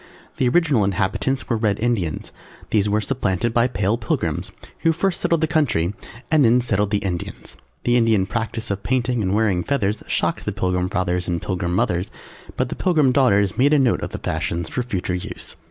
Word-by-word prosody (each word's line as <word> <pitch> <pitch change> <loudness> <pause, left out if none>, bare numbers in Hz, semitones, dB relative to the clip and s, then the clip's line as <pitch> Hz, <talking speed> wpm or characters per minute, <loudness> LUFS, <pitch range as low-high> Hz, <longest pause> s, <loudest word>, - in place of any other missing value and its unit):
The 125 - +2
Original 145 -6 +3
inhabitants 100 +6 -1
were 120 - +1
Red 105 -3 0
Indians; 105 -10 -1 0.4
these 105 -1 +2
were 105 +1 +2
supplanted 115 -2 -1
by 120 +1 +3
Pale 105 -2 0
Pilgrims, 110 - -2 0.3
who 165 - +3
first 175 +3 -1
settled 170 -2 +1
the - - +4
country 125 - +1 0.4
and 155 -2 +5
then 120 +1 +5
settled 105 -4 +1
the 105 - +1
Indians. 90 -3 -5 0.3
The 120 - +2
Indian 110 -5 +3
practice 115 +1 -3
of 100 0 -2
painting 125 -1 0
and 95 0 0
wearing 105 -5 +2
feathers 105 -7 0
shocked - - -1
the - - -2
Pilgrim 90 0 0
Fathers 90 -2 -1
and 85 -1 -1
Pilgrim 90 -2 -2
Mothers, 90 0 0 0.5
but 130 -1 0
the - - -4
Pilgrim 155 -8 +3
Daughters 100 -6 +3
made 140 +3 +4
a - - +5
note 130 -4 +2
of - - -3
the - - -6
fashions 85 +1 -2
for - - -2
future 95 -7 -3
use. 90 - -5
110 Hz, 190 wpm, -22 LUFS, 95-125 Hz, 0.5 s, and